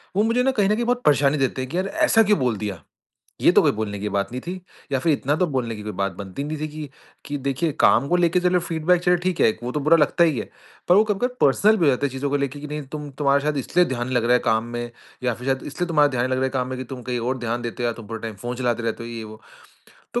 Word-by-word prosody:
वो 205 - +3
मुझे 230 +3 +2
ना 265 - +3
कहीं 205 -6 +1
न 210 - +3
कहीं 235 +2 -1
बहुत 245 +1 0
परेशानी 145 0 +4
देते 135 -1 0
हैं 130 - -5
कि 175 - -2
यार 190 +1 0
ऐसा 225 +2 +3
क्यों 210 -1 +2
बोल 125 -4 0
दिया? 100 -6 -5 0.6
ये - - +6
तो - - +5
कोई - - +3
बोलने 105 -2 -3
की 105 +1 -3
बात 100 +3 -1
नहीं 125 - -4
थी। 175 +5 -5 0.4
या 135 - +1
फिर 160 +3 +2
इतना 145 +1 0
तो 180 - +2
बोलने 120 -3 -1
की 105 - -8
कोई 105 - -4
बात 100 -1 -2
बनती 100 +7 -6
नहीं 155 +1 -4
थी 155 - -2
कि 150 -1 -8 0.4
कि 145 0 -3
देखिए 140 +4 -1
काम 140 - +4
को 175 - +2
लेके 175 0 +3
चलो 180 0 +3
फ़ीडबैक 170 +1 +1
चलो 180 0 +4
ठीक 185 -2 -1
है - - +6
वो 125 - -3
तो 150 - -1
बुरा 155 +4 +4
लगता 155 +2 +3
ही 155 -7 +1
है। - - -6 0.4
पर 180 - +7
वो 210 - +6
कभी-कभी 220 +4 -1
पर्सनल 205 +11 +4
भी 175 - +2
हो - - +6
जाता 130 +2 0
है - - -6
चीज़ों 135 +2 -3
को - - +1
लेके 140 +1 -3
कि 150 - -6
नहीं 150 0 -4
तुम 150 -1 -5
तुम्हारा 140 0 +2
शायद 150 -1 0
इसलिए 175 +6 +2
ध्यान 120 -5 -3
नहीं 130 - -3
लग 120 - +1
रहा 120 - +4
है 125 - +5
काम 110 +1 +2
में 120 0 -4 0.3
या 125 -1 +1
फिर 125 +3 -9
शायद 135 0 0
इसलिए 175 +5 -3
तुम्हारा 150 -3 +4
ध्यान 120 -2 0
नहीं 130 - -1
लग 130 - 0
रहा 130 - +1
है - - 0
काम 130 -1 -2
में 130 - -4
कि - - -3
तुम 125 - -8
कहीं 125 0 -2
और 125 +3 -1
ध्यान 120 0 -2
देते 120 +1 -5
हो 120 - +2
या 115 - -1
तुम 115 -3 -11
पूरा 115 +1 -5
टाइम 115 -2 -5
फ़ोन 120 +1 -3
चलाते 120 -2 -1
रहते 115 0 -3
हो 115 - -7
ये 115 -1 -6
वो। 110 0 -11 0.7
तो - - +1
135 Hz, 315 wpm, -23 LUFS, 120-170 Hz, 0.7 s, पर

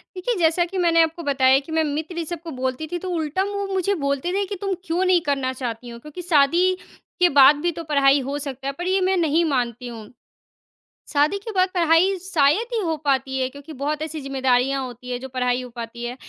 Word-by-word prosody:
देखिए, 415 +7 -1
जैसा 330 +1 +3
कि 375 +2 -6
मैंने 335 -2 +4
आपको 325 +1 -3
बताया 265 -2 +4
कि 320 - -10
मैं 320 0 +2
मित्र 310 +3 -4
इ, 340 - -1
सब 340 0 -6
को 330 - -7
बोलती 260 +3 -3
थी, 350 - -1
तो 370 - -5
उल्टा 330 +1 -1
मुँह 400 -1 -3
मुझे 380 +1 +1
बोलते 280 +5 -1
थे 400 +1 0
कि, 400 - -5
"तुम 395 -1 -1
क्यों 345 +2 0
नहीं 365 -2 +4
करना 270 -2 0
चाहती 245 -2 -5
हो, 235 0 -9
क्योंकि 300 +7 -9
शादी 345 +2 +3 0.5
के 360 0 +5
बाद 280 0 +7
भी 345 +1 +1
तो 335 0 -7
पढ़ाई 280 -1 +5
हो 285 - -2
सकता 275 -2 -6
है।" 275 - -2
पर 350 +1 -4
ये 380 +1 +2
मैं 375 +1 +2
नहीं 330 0 +2
मानती 245 0 -2
हूँ, 225 -3 -9 1.0
शादी 300 +7 +2
के 410 +3 -8
बाद 370 0 +3
पढ़ाई 340 +2 +4
शायद 335 +3 +2
ही - - +1
हो 325 -3 -1
पाती 265 -1 0
है 260 -1 0
क्योंकि 285 +3 -11
बहुत 300 +2 -1
ऐसी 315 0 -5
ज़िम्मेदारियाँ 270 0 +1
होती 250 0 -9
हैं 245 - -2
जो 265 - -7
पढ़ाई 250 -1 0
हो 250 - -8
पाती 235 0 -7
है। 240 +1 -4
300 Hz, 230 wpm, -22 LUFS, 265-350 Hz, 1.0 s, बाद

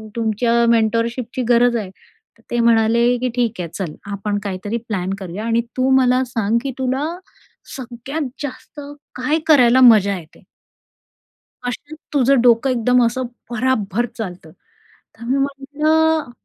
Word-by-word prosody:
तुमच्या 230 +1 +1
मेंटॉरशिपची 230 +2 0
गरज 240 0 +4
आहे." 205 -4 -5 0.5
तर - - -25
ते 240 - 0
म्हणाले, 230 0 +3
की 250 +1 -2
"ठीक 235 -4 -1
आहे 170 -2 -4
चल, 175 -6 -5 0.2
आपण 205 +1 -2
काहीतरी 205 +3 -4
प्लॅन 190 -3 -2
करूया 190 +3 -6
आणि 230 0 +1 0.2
तू 255 +1 +2
मला 255 0 +3
सांग, 225 -2 -1
की 275 - -3
तुला 265 +2 -1 0.7
सगळ्यात 260 +4 -5 0.2
जास्त 290 +2 -8 0.4
काय 295 +6 0
करायला 260 -4 +5
मजा 205 -5 +6
येते?" 160 -3 -15 1.2
"कशात 290 +5 -6 0.2
तुझं 275 -2 +3
डोकं 240 +2 +4
एकदम 250 0 +2
असं 255 +2 -1 0.3
भराभर 240 -2 0
चालतं." 180 -7 -7 0.7
तर 235 - -11
मी 260 +3 0
म्हटलं, 295 +2 0
240 Hz, 135 wpm, -19 LUFS, 220-260 Hz, 1.2 s, मजा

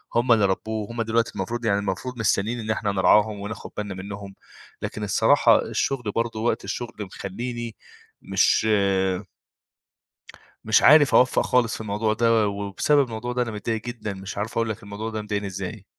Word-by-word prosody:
هُم 120 +1 +2
اللي 105 -3 +5
ربوه، 110 +3 -2
هُم 115 0 -3
دلوقتي 115 +1 0
المفروض 120 0 -3
يعني 100 -2 +2
المفروض 100 +6 -4
مستنيين 110 +2 0
إن 110 -1 -6
إحنا 105 -2 -1
نرعاهم 105 +2 +3
وناخد 105 +2 -7
بالنا 105 -1 -3
منهم 100 0 -8 0.5
لكن 105 - -4
الصراحة 100 - +4
الشغل 125 -6 -1
برضه 115 -1 -1
وقت 115 +2 0
الشغل 115 +4 -5
مخلّيني 115 +4 -5 0.5
مش - - +2
آآ 95 -2 +1 1.4
مش - - +4
عارف 150 -2 +7
أوفق 125 0 +4
خالص 120 -2 +1
في - - -7
الموضوع 110 +1 -1
ده، 115 -1 +3
وبسبب 100 +8 +1
الموضوع 120 +1 -5
ده 125 0 0
أنا 120 - -3
متضايق 110 +1 -3
جدًا، 115 -4 -5
مش 95 +1 -7
عارف 110 +2 -3
أقول 115 -1 0
لك 110 +1 -5
الموضوع 105 +2 -6
ده 110 -1 -4
مضايقني 105 -1 -3
إزاي. 95 - -6
110 Hz, 170 wpm, -24 LUFS, 100-115 Hz, 1.4 s, عارف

